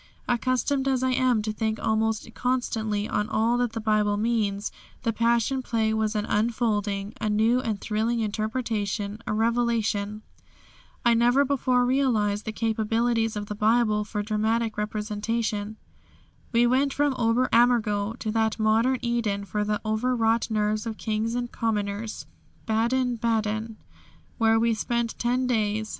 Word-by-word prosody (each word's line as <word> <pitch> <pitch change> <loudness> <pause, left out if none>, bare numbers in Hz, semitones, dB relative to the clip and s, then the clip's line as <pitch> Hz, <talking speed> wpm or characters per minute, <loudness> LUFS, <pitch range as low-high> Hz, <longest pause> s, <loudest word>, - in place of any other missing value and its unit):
Accustomed 255 +3 0
as 260 -1 +1
I 260 - +2
am 255 -4 +2
to 215 0 -2
think 220 0 -1
almost 220 0 0
constantly 220 -4 -1
on 210 +1 -1
all 225 +2 +2
that 245 -2 0
the 225 - -3
Bible 215 -1 +1
means, 210 -2 0 0.3
the 230 - 0
Passion 235 +3 +1
Play 225 -3 0
was 220 0 0
an 210 0 0
unfolding, 210 -3 -1
a 215 - 0
new 220 +4 +3
and 220 -5 -2
thrilling 225 +3 -1
interpretation, 215 -1 -2
a - - 0
revelation. 220 -2 0 0.8
I 235 - +5
never 245 +4 +4
before 255 -2 +2
realised 230 -6 +1
the 220 - -3
capabilities 225 +1 0
of 205 0 -3
the 210 - -5
Bible 215 0 +2
for 210 0 -4
dramatic 220 +1 0
representation." 215 0 -2 0.7
We 235 0 +4
went 265 +3 +2
from 290 -1 +2
Ober 235 +2 +2
Ammergau 230 -3 +2
to 215 - -2
that 220 -1 +1
modern 225 +4 +2
Eden 225 -4 -1
for 210 +1 -2
the 210 0 -1
overwrought 225 +1 +1
nerves 215 0 0
of 220 -1 -4
kings 220 +1 -2
and 245 -1 -3
commoners 210 -1 -2 0.4
Baden 240 +3 +1
baden, 220 -1 -1 0.6
where 225 0 +4
we 230 0 +2
spent 235 +1 -2
ten 250 +2 +1
days. 220 -3 0
225 Hz, 145 wpm, -26 LUFS, 215-235 Hz, 0.8 s, I